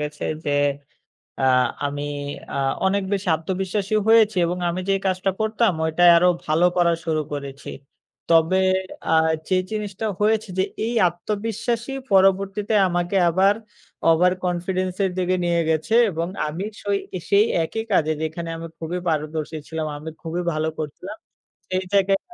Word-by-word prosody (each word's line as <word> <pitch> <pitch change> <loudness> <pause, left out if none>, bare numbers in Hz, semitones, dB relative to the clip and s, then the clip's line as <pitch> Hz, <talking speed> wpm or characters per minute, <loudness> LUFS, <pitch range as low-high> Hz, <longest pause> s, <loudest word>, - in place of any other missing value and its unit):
গেছে 150 0 -4 0.2
যে, - - -1 0.9
আ - - -1 0.4
আমি 145 0 -4 0.5
আ - - -2 0.3
অনেক 200 +1 +1
বেশি 195 -2 -1
আত্মবিশ্বাসী 190 +4 -2
হয়েছি 220 -2 +5
এবং 175 +1 -2
আমি 175 +2 -2
যে - - +4
কাজটা 185 +1 +1
করতাম 220 -1 +2
ওটা 160 +2 0
আরও 180 +2 +5 0.2
ভালো 155 +3 +2
করা 175 -1 +4
শুরু 160 -2 0
করেছি। 140 -1 -6 0.6
তবে, 165 +3 +4 0.5
আ - - +2 0.4
যে 185 - +2
জিনিসটা 210 0 -4
হয়েছে 215 0 +2
যে 190 - +3 0.2
এই 235 - -2
আত্মবিশ্বাসী 220 +7 -3 0.2
পরবর্তীতে 195 +2 +3
আমাকে 175 +2 -1
আবার 190 +4 +4 0.6
over 180 +3 +4
confidence 180 +1 -1
-এর 190 - +2
দিকে 185 0 +1
নিয়ে 170 -1 +2
গেছে 160 +7 0 0.2
এবং 165 -1 -2 0.2
আমি 160 +6 -4 0.2
সই 200 -1 0 0.3
সেই 200 +1 +6 0.2
একই 220 +7 -4
কাজে 155 -4 +3
যেখানে 160 +2 -4
আমি 165 - -7
খুবই 170 +2 -4
পারদর্শী 155 0 -2
ছিলাম, 160 -1 -3
আমি 155 +2 -7
খুবই 170 +1 -3
ভালো 155 0 -1
করছিলাম। 165 +8 -7 0.6
সেই 185 0 0
জায়গায় 195 0 +3
180 Hz, 145 wpm, -22 LUFS, 160-200 Hz, 0.9 s, সেই